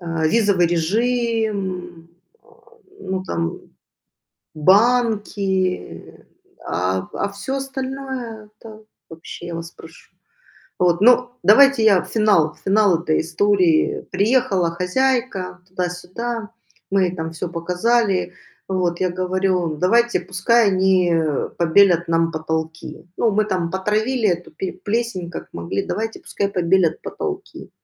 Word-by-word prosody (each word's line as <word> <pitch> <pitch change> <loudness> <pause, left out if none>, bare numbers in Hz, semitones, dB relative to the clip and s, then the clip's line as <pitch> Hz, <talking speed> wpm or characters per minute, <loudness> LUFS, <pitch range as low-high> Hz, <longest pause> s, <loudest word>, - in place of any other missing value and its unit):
А, 165 -2 -2
визовый 200 -1 +3
режим, 195 -2 -1 0.3
а, - - -30 0.5
ну 185 0 -3
там, 85 - -3 0.9
банки. 200 - +1 0.4
А, 90 +3 -1
а, - - -2
в - - -13
всё 265 +7 -3
остальное- 265 -4 -6
это 220 -1 -12 0.3
вообще, 165 +1 -9
я 170 - -5
вас 165 0 -7
прошу. 165 0 -16 0.7
Вот. 175 -1 +2
Ну, 245 +2 +5
давайте 230 +4 +6
я 200 -5 +5
финал 205 -8 +2
финал 195 -4 +3
этой 155 -3 +1
истории. 175 -1 +2
Приехала 200 -3 +1
хозяйка, 185 -1 -1
туда-сюда. 185 +6 -4 0.4
Мы 195 -1 +3
ей 180 0 -2
там 160 -1 -4
всё 165 +2 -5
показали. 180 +3 0 0.3
Вот 180 -2 -1
я 185 -1 +1
говорю: 185 -2 -1
"Давайте, 235 +9 +2
пускай 210 +4 +2
они 185 -2 +2 0.5
побелят 175 0 +4
нам 165 0 +2
потолки. 160 0 -5
Ну, 230 - +2
мы 215 +1 +1
там 185 -5 -2
потравили 215 +5 0
эту 175 -1 -2
пе 185 +4 -5
плесень 205 -3 -3
как 175 - -8
могли. 85 +3 -3
Давайте, 220 +4 -3
пускай 200 - -3
побелят 180 -3 +1
потолки". 390 -1 -6
190 Hz, 120 wpm, -20 LUFS, 170-220 Hz, 0.9 s, давайте